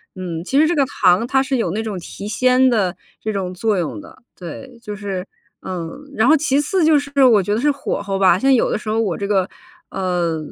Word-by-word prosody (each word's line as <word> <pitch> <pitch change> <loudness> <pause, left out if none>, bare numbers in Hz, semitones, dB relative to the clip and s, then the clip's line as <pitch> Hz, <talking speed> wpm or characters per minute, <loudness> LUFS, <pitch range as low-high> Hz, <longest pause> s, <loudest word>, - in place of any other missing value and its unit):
嗯， 175 -3 -5
其 270 +9 +1
实 315 - +5
这 345 - 0
个 280 -3 +3
糖 190 -5 +2
它 265 +2 +2
是 265 0 -1
有 225 -9 -1
那 210 +5 -2
种 215 -3 -4
提 195 +3 -8
鲜 255 +4 +3
的 200 -7 +1 0.3
这 220 - -2
种 190 -3 -3
作 210 +2 0
用 175 - -3
的。 315 - -16 0.2
对， 235 - -9
就 210 - -6
是， 195 -3 -5 0.4
嗯， 170 -3 -5 0.2
然 225 -3 +2
后 310 - +6
其 285 -2 +1
次 335 +5 0
就 310 -2 +5
是 280 -1 0
我 230 -6 +6
觉 205 +3 -1
得 - - -1
是 295 +2 +3
火 280 -6 -3
候 195 -1 -3
吧， 185 -2 +5
像 270 +7 +3
有 250 - +2
的 - - 0
时 215 - -7
候 220 +1 0
我 200 -7 -1
这 200 - -3
个， 195 -2 +1 0.4
呃， 180 -3 -1
215 Hz, 255 characters per minute, -19 LUFS, 185-265 Hz, 0.4 s, 后